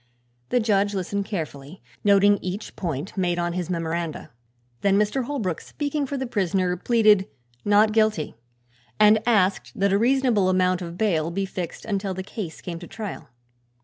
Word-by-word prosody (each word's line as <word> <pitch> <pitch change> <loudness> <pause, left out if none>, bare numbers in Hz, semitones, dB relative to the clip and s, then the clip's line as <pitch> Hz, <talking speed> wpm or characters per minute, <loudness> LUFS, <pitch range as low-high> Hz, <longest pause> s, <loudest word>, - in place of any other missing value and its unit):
The 250 - +2
judge 205 -2 +1
listened 195 +2 -2
carefully, 155 -4 -6 0.2
noting 205 0 +5
each 185 +4 -5
point 165 -1 -4
made 180 -3 0
on 175 0 -1
his 180 -1 -3
memoranda. 165 -2 -3 0.5
Then 200 0 +3
Mr. 210 +5 +1
Holbrook, 225 - -2
speaking 290 -1 -3
for 280 - -3
the 265 - -2
prisoner, 190 -5 0
pleaded 210 -1 +4 0.4
"not 210 +1 +4
guilty" 215 -7 +1 0.7
and 215 +1 +6
asked 200 -5 +2
that 200 0 +3
a 200 - +3
reasonable 240 -5 +3
amount 185 0 +2
of 170 0 -6
bail 170 -7 +1
be 195 +3 -2
fixed 180 -3 -6
until 200 -3 -2
the 190 - -4
case 185 -4 -7
came 170 -2 -6
to 175 - -10
trial. 210 -5 -7
195 Hz, 160 wpm, -24 LUFS, 180-215 Hz, 0.7 s, and